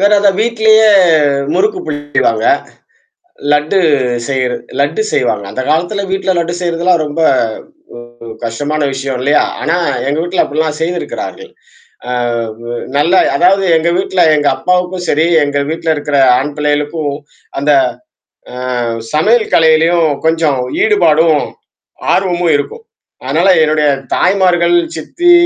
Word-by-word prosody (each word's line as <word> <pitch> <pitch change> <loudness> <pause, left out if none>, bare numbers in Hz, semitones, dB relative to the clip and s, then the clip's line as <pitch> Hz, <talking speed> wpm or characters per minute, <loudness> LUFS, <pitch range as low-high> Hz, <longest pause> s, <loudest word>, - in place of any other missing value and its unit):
வேற 200 +1 +3
அத 200 - +3
வீட்டிலேயே 220 -1 +3 0.6
முறுக்கு 415 -2 +1
புளிவாங்க. 145 -6 -1 1.1
லட்டு 150 +6 +1 0.5
செய்ர 130 -2 -1 0.3
லட்டு 160 +9 0
செய்வாங்க. 105 -5 0
அந்த 130 +6 -4
காலத்தில 175 +6 -1
வீட்டில 190 0 -1
லட்டு 170 +1 -2
செய்றதுலாம் 170 0 +1
ரொம்ப 150 +3 -4 0.8
ஒரு 120 0 -13 0.2
கஷ்டமான 145 +7 -3
விஷயம், 135 -1 -4
இல்லையா? 145 +3 +2 0.2
ஆனா 165 +3 0 0.3
எங்க 145 +2 -1
வீட்டில 175 +2 0
அப்படிலாம் 155 +1 -2
செய்துருக்கிறார்கள். 175 - -5 0.6
அ, - - -3 0.5
வு 120 - -8 0.3
நல்ல 155 +6 +2 0.2
அதாவது 195 +2 +3
எங்க 160 +1 -1
வீட்டுல, 190 -1 -1 0.2
எங்க 145 -1 +1
அப்பாவுக்கும் 180 0 -1
சரி, 155 +3 +2 0.2
எங்க 145 0 -1
வீட்டுல 165 0 -3
இருக்கற 145 0 -2 0.2
ஆண் 145 +3 -3
பிள்ளைகளுக்கும் 150 0 -1 0.5
அந்த, 145 +2 +1 0.8
அ - - -9 0.6
சமையல் 220 +9 +2
கலையிலயும் 165 0 +3 0.2
கொஞ்சம் 160 -4 +1 0.2
ஈடுபாடும், 165 -7 +3 0.7
ஆர்வமும் 175 -3 +1
இருக்கும். 450 - -6 0.4
அதனால 155 +9 +1
என்னுடைய 155 -1 +1 0.3
தாய்மார்கள், 180 -2 +2 0.2
சித்தி, 350 - 0
160 Hz, 120 wpm, -13 LUFS, 145-180 Hz, 1.1 s, வேற